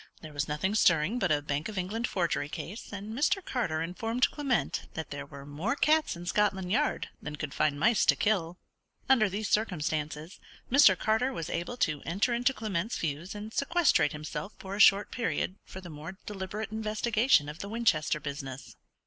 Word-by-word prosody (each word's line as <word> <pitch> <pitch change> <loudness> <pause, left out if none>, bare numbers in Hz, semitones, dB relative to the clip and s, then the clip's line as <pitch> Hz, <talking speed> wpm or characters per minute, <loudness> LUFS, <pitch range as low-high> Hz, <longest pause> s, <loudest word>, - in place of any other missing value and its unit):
There 155 -1 -9
was 145 0 -1
nothing 150 +7 -1
stirring 175 +2 +3
but 195 -7 +1
a 145 -1 +2
Bank 145 +5 -2
of 210 - -7
England 210 +6 -1
forgery 170 -5 -1
case; 200 +8 -7
and 205 +1 -6
Mr. 360 - +1
Carter 165 -11 -1
informed 225 +8 0
Clement 275 -6 -1
that 160 -2 -5
there 145 0 -6
were 140 -1 -10
more 155 - -2
cats 310 - +3
in 170 +1 -8
Scotland 190 -1 +1
Yard 290 +7 +1
than 150 - -5
could 150 -1 -5
find 150 -2 +1
mice 220 +5 +4
to - - +6
kill. 180 -5 0 0.5
Under 235 -6 +5
these 205 +3 -3
circumstances, 155 -5 -1 0.3
Mr. 245 -9 +7
Carter 220 +5 +1
was 165 -9 -5
able 175 +9 -3
to 155 - 0
enter 195 - 0
into 245 +3 +2
Clement's 215 -3 -2
views, 160 +5 -3
and 210 +2 -7
sequestrate 280 - +3
himself 155 +6 -6
for 195 +1 -6
a - - -6
short 200 0 +6
period 225 -5 -2
for 190 - -9
the 180 - -10
more 155 +5 -8
deliberate 210 +2 -5
investigation 220 - +2
of 150 +3 -7
the 200 - -6
Winchester 205 -10 +1
business. 140 -2 -7
190 Hz, 185 wpm, -29 LUFS, 155-225 Hz, 0.5 s, Mr